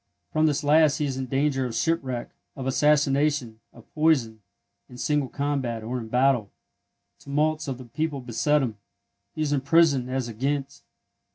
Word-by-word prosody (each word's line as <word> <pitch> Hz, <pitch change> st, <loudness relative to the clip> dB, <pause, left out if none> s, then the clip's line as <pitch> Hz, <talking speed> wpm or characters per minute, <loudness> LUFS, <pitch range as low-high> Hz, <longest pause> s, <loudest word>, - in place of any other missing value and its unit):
From 155 Hz, 0 st, +3 dB
this 150 Hz, 0 st, 0 dB
last 150 Hz, 0 st, +4 dB
he 150 Hz, -, -1 dB
is 135 Hz, -2 st, -3 dB
in 130 Hz, -1 st, -3 dB
danger 135 Hz, +1 st, 0 dB
of 115 Hz, -, -6 dB
shipwreck, 135 Hz, -8 st, -1 dB, 0.2 s
of 135 Hz, -, -6 dB
assassination, 140 Hz, -3 st, +2 dB
of 115 Hz, -, -17 dB
poison, 135 Hz, -9 st, +2 dB, 0.5 s
in 125 Hz, -, -12 dB
single 145 Hz, 0 st, 0 dB
combat, 135 Hz, -6 st, -2 dB
or 125 Hz, +3 st, -3 dB
in 115 Hz, -, -7 dB
battle; 125 Hz, -3 st, +2 dB, 0.7 s
tumults 155 Hz, +3 st, -1 dB
of 135 Hz, -2 st, -3 dB
the 130 Hz, -, -10 dB
people 145 Hz, +4 st, -3 dB
beset 125 Hz, +4 st, +1 dB
him; 110 Hz, -5 st, -4 dB, 0.6 s
he 155 Hz, -, -1 dB
is 145 Hz, -1 st, 0 dB
imprisoned 140 Hz, -2 st, +3 dB
as 130 Hz, -1 st, -2 dB
at 115 Hz, -2 st, -9 dB
Ghent. 140 Hz, +1 st, -2 dB
135 Hz, 165 wpm, -25 LUFS, 125-150 Hz, 0.7 s, last